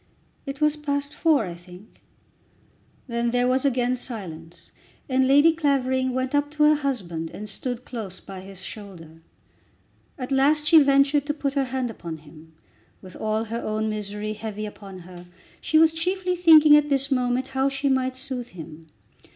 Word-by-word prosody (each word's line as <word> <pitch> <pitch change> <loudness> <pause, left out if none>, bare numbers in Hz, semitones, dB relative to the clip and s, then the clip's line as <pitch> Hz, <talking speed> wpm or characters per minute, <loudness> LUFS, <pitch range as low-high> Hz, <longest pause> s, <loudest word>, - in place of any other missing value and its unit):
"It 275 +2 -6
was 300 0 +3
past 285 -1 -3
four 305 -9 +2
I 175 - -6
think." 180 +4 -15 1.0
Then 235 -1 -1
there 245 +1 +1
was 260 +2 +1
again 250 -2 +1
silence, 170 -9 -8 0.4
and 260 0 +2
Lady 290 +4 +5
Clavering 260 -4 0
went 260 +1 -2
up 290 0 +1
to 300 0 +1
her 300 0 +6
husband 195 - -3
and 210 +5 -8
stood 245 +4 -5
close 210 -7 -6
by 195 -1 -10
his 190 0 -11
shoulder. 175 -6 -10 1.0
At 255 -1 -6
last 290 +3 +3
she 320 0 +7
ventured 280 +1 +3
to 295 - -1
put 280 -2 -2
her 275 -1 +1
hand 255 -2 -3
upon 170 -6 -7
him. 155 +1 -16 0.5
With 185 -1 -12
all 215 0 -1
her 230 +1 -5
own 215 0 -2
misery 210 0 -4
heavy 215 0 -6
upon 195 -3 -10
her, 175 0 -12 0.3
she 315 - +2
was 320 0 +6
chiefly 365 +2 -1
thinking 315 -4 +7
at 295 0 +3
this 275 0 +1
moment 255 0 0
how 265 0 +1
she 275 +1 -2
might 260 -1 +1
soothe 260 -2 -5
him. 160 -5 -11
255 Hz, 170 wpm, -24 LUFS, 200-280 Hz, 1.0 s, she